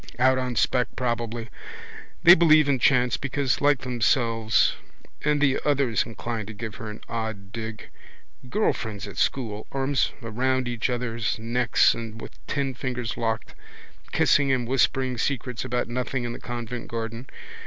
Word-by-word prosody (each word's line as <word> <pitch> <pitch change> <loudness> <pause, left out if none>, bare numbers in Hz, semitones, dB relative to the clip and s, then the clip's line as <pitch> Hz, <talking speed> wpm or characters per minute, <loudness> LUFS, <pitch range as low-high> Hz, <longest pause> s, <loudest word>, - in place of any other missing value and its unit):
Out 130 +1 +4
on 125 -1 -2
spec 125 +2 +2
probably. 120 -2 -2 0.8
They 175 0 +11
believe 155 -4 +6
in 135 -2 +2
chance 125 -1 +3
because 135 -1 -1
like 145 -2 +3
themselves. 115 -3 +2 0.5
And 150 0 +2
the 140 -2 +3
others 140 -6 +2
inclined 115 -1 -5
to 105 - -8
give 110 0 -6
her 115 -4 -6
an 105 - -8
odd 110 -4 -4
dig. 110 -1 -6 0.6
Girl 215 +10 +2
friends 105 -3 -6
at 100 - -10
school, 110 -5 -1
arms 135 0 +1
round 130 +3 -1
each 120 0 -1
other's 120 -2 -1
necks 120 +2 +3
or 115 -2 -6
with 115 - -10
ten 140 -2 -1
fingers 125 -2 -3
locked, 110 -1 -2 0.6
kissing 140 -1 +3
and 125 -3 0
whispering 130 -1 +1
secrets 125 -2 -2
about 125 0 -1
nothing 125 +1 -2
in 120 0 -3
the - - -8
convent 120 0 -5
garden. 115 +2 -5
120 Hz, 155 wpm, -25 LUFS, 115-130 Hz, 0.8 s, They